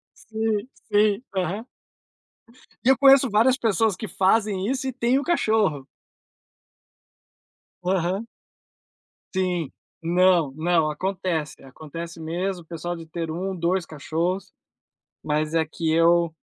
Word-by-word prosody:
Sim, 220 0 -2 0.2
sim, 210 +1 +3
aham. 190 +5 -2 1.2
E 255 - +3
eu 265 - +6
conheço 275 -1 +6
várias 230 +5 +4
pessoas 220 -3 +1
que 215 - -6
fazem 200 0 +1
isso 265 +1 -1
e - - -1
tem 255 +1 +1
o - - -4
cachorro. 215 - +1 2.0
Aham. 185 +4 0 1.1
Sim, 180 -5 -1 0.3
não, 175 -3 +3
não, 160 -1 +2
acontece. 180 -4 -3
Acontece 165 +5 -9
mesmo, 175 +3 -3
o - - -28
pessoal 170 +1 -5
de 165 - -9
ter 165 0 -5
1, 185 +3 -3
2 175 +1 0
cachorros, 165 +5 -3 0.7
mas 150 +1 -1
é 165 -1 +3
que 160 +1 -4
eu 170 0 +3
180 Hz, 120 wpm, -24 LUFS, 165-215 Hz, 2.0 s, eu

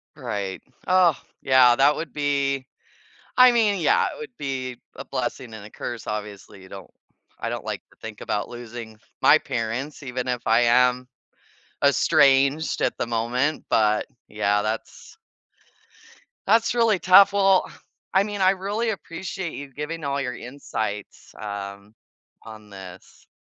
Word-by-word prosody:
Right. 100 -2 -4 0.3
Ugh, 180 -4 +4 0.3
yeah, 130 -2 +5
that 140 +3 +4
would 160 -3 -6
be 140 -2 0 0.7
I 255 0 +8
mean, 215 -5 +2
yeah, 460 +3 +3
it - - -11
would 450 - -9
be 130 -3 -4 0.2
a - - -8
blessing 120 -4 -4
and 105 -2 -9
a - - -11
curse, 120 +1 -7
obviously, 105 -2 -6
you 95 - -15
don't 100 -1 -11 0.5
I - - -3
don't - - -5
like - - -4
to - - -24
think 110 -2 -9
about 105 - -2
losing 120 -2 -9 0.2
my 155 - +7
parents 130 +2 -4
even 125 -1 -4
if 125 -1 -2
I 115 +2 +4
am 125 +1 +3 0.8
estranged 140 +3 +3
at - - 0
the - - -1
moment, 120 +6 -1
but 105 -1 +2 0.2
yeah, 105 -1 +1
that's 110 +1 -6 1.3
that's 230 +3 +3
really 225 -5 +3
tough. 195 +2 +7
Well, 195 -2 +3 0.4
I 190 +1 +4
mean 205 -1 -4
I 185 0 +5
really 205 +4 -2
appreciate 185 -3 -5
you 140 -1 -8
giving 150 +3 -5
all 140 0 -1
your 125 -2 -4
insights, 110 -6 -6
um, 100 0 -7 0.5
on 110 -1 -12
this. 95 -2 -13
130 Hz, 145 wpm, -24 LUFS, 110-170 Hz, 1.3 s, I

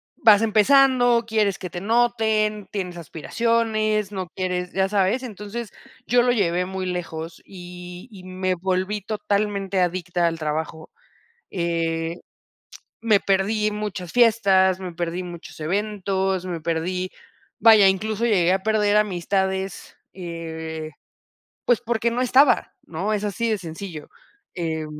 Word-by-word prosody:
vas 215 -2 +6
empezando, 245 +2 +4
quieres 215 -3 +1
que 180 - -6
te 175 0 -6
noten, 220 -2 +1
tienes 180 -4 -4
aspiraciones, 215 +5 -1
no 185 -2 -4
quieres 180 -1 -2
¿ya 190 0 +1
sabes? 200 +5 +1
Entonces, 215 -1 -7 0.3
yo 245 +1 +4
lo 245 - +3
llevé 180 -6 +1
muy 190 0 -4
lejos 170 -2 -5
y 180 0 -10
y 195 -5 -13
me 185 0 -2
volví 190 +3 -1
totalmente 200 -2 -1
adicta 175 -1 0
al 165 -1 -3
trabajo. 155 +1 -4 0.6
Eh, 165 -2 -1 0.9
me 220 -3 +3
perdí 205 +2 +1
muchas 210 -4 -5
fiestas, 195 -6 +4
me 180 -2 -6
perdí 170 +1 -3
muchos 175 -2 -10
eventos, 190 +1 -1
me 175 -2 -4
perdí 175 +3 -2 0.5
vaya, 220 -3 +7
incluso 215 +4 +1
llegué 185 -6 +3
a 190 0 -1
perder 210 -1 +2
amistades, 190 -1 -1 0.2
eh, 160 -3 -6 0.7
pues 245 -3 +3
porque 235 0 0
no 240 +2 -2
estaba, 260 +2 +4
¿no? 190 +6 -3
Es 210 0 -2
así 220 +3 -1
de 220 - +1
sencillo, 165 -2 -8 0.5
eh 160 -2 -2
190 Hz, 130 wpm, -23 LUFS, 175-215 Hz, 0.9 s, vaya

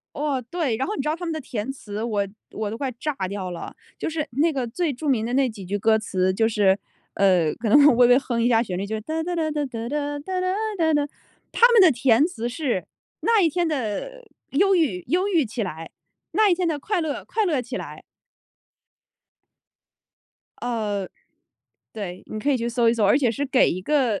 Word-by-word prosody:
哦， 285 -3 -1
对， 320 -10 -1
然 265 - -1
后 425 - -2
你 - - -2
知 270 - -4
道 310 - 0
他 350 - -7
们 330 - -2
的 315 - -3
填 250 -1 -4
词， 215 -4 -6
我 205 -4 -1 0.2
我 215 -1 -3
都 225 - -5
快 270 -1 -2
炸 300 - -2
掉 190 -2 -4
了。 170 - -7 0.2
就 - - -3
是 315 -1 -3
那 300 +7 +2
个 265 -4 -2
最 325 +7 -1
著 280 +4 -6
名 240 -6 +2
的 240 - -3
那 265 -1 +3
几 215 -3 -9
句 200 +3 -2
歌 220 +2 +3
词， 185 -3 0
就 225 +3 +2
是， 200 -3 +3 0.4
呃， 180 -6 +3
可 225 - -3
能 285 +6 +7
微 245 0 +6
微 245 +1 +6
哼 240 -4 -1
一 240 - +3
下 225 -1 +4
旋 185 -6 -4
律， 195 - -2
就 220 +2 -3
是 215 - -4
哒 315 +8 -3
哒 350 +1 -3
哒 315 -2 0
哒 295 -1 -1
哒 235 -3 -5
哒 290 +1 -2
哒 370 +5 -3
哒 370 0 0 0.2
哒 320 -2 +2
哒， 290 -1 +1 0.4
他 475 - +6
们 455 -4 +7
的 360 - +7
填 250 +1 +3
词 240 -9 -4
是： 245 - -2 0.4
“那 455 -2 +3
一 335 - +4
天 350 +2 0
的 310 - -4 0.3
忧 390 +7 +3
郁， 260 - +1
忧 370 +4 +1
郁 335 -8 +2
起 225 +1 -4
来； 165 -4 -5 0.4
那 430 -2 +4
一 350 - +4
天 360 -1 0
的 310 -3 -1
快 395 +4 -1
乐， 310 -3 -3
快 440 -1 -1
乐 300 -8 +1
起 245 +2 -5
来。” - - -8 2.6
呃， 210 -5 -2 0.9
对， 185 -4 -6
你 215 - -6
可 285 +7 0
以 270 - +3
去 235 0 -2
搜 235 0 +2
一 230 - +3
搜， 225 -3 +1
而 205 +8 +5
且 250 -5 +2
是 280 +5 -2
给 260 -1 +3
一 185 - -3
个 250 -3 +1
255 Hz, 240 characters per minute, -23 LUFS, 215-315 Hz, 2.6 s, 能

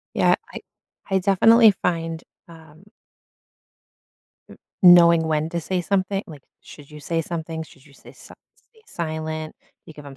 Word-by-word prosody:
Yeah. - - +3 0.2
I - - -8 0.5
I 190 - +2
definitely 220 +4 +5
find, 165 -1 -3 0.3
um 160 +1 -17 1.6
m - - -15 0.3
knowing 170 -2 +6
when 155 0 -1
to 170 - -4
say 180 +3 -3
somethi 195 +1 -2
like, 150 -4 -13 0.2
should 145 0 -16
you 150 - -12
say 165 +3 -3
something, 160 0 -6
should 135 -3 -17
you 145 - -21
say - - -17
si - - -16 0.2
stay 445 -2 -29
silent, 155 -1 -6 0.3
you - - -12
give 150 -1 -14
'em 135 - -12
165 Hz, 155 wpm, -21 LUFS, 155-180 Hz, 1.6 s, knowing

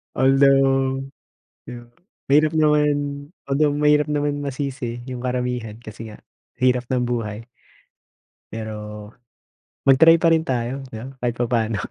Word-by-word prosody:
Although 135 0 +3 0.6
di 125 - -8
ba, 120 - -20 0.4
mahirap 155 +2 +4
naman, 150 -1 +3 0.6
although 145 +1 +2
mahirap 150 0 +3
naman 145 -1 -1
masisi 130 -4 -4
yung 125 - -5
karamihan 125 -3 -3
kasi 110 0 -9
nga 105 - -12 0.4
hirap 125 -1 +2
ng 125 0 0
buhay. 115 -3 -3 1.1
Pero 110 -1 -5 1.1
mag-try 160 +5 +7
pa 165 - +2
rin 160 - 0
tayo. 130 +1 -2
Di 110 - -7
ba 125 - -7 0.2
kahit 120 -1 -1
papaano. 115 -3 0
130 Hz, 125 wpm, -22 LUFS, 120-145 Hz, 1.1 s, mag-try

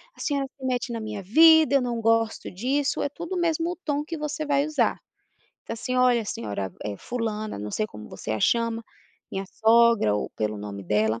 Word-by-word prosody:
a - - -21
senhora 280 -2 -1
se 265 - -7
mete 250 -1 -1
na 230 - -3
minha 215 -2 -5
vida, 315 - +6
eu 275 - +5
não 240 -2 -2
gosto 225 0 +1
disso", 270 +9 0
é - - 0
tudo 340 +5 -6
o - - -1
mesmo 335 +1 0
tom 290 -1 0
que 330 +1 -5
você 300 0 -3
vai 285 -1 +2
usar. 310 -2 +1 0.7
Então, - - -5
assim, 255 +2 -4
"Olha, 250 -2 +4
senhora, 100 - -4
eh, 105 -1 -3
fulana", 215 - -4
não 105 +1 -5
sei 215 - -1
como 105 - -11
você - - -7
a 110 -1 -1
chama. 230 - +1 0.5
Minha 195 0 -3
sogra 225 - +4
ou 105 - -2
pelo 105 -1 -2
nome 100 -1 -6
dela, 110 +3 +1
230 Hz, 205 wpm, -25 LUFS, 180-285 Hz, 0.7 s, vida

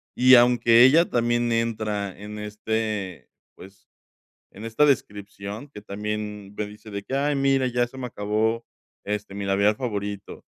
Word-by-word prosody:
y 130 +1 +7
aunque 120 -1 +6
ella 155 +7 +5
también 120 0 +1
entra 110 -4 -2
en 105 +1 -8
este 105 -2 -4 0.3
pues, 95 +1 -15 0.7
en 105 - -10
esta 115 +6 +2
descripción, 105 -2 -2
que 135 - -11
también 105 0 -5
me 105 - -2
dice 105 +1 -13
de 100 -1 -5
que: 130 - -6
"Ay, 145 +2 +1
mira, 135 -1 +2
ya 120 0 +1
se 120 - -14
me 130 - -4
acabó 110 +1 -1 0.4
este, 105 -1 -4
mi 100 0 -4
labial 100 +2 +2
favorito", 105 -5 -5
105 Hz, 155 wpm, -24 LUFS, 105-120 Hz, 0.7 s, y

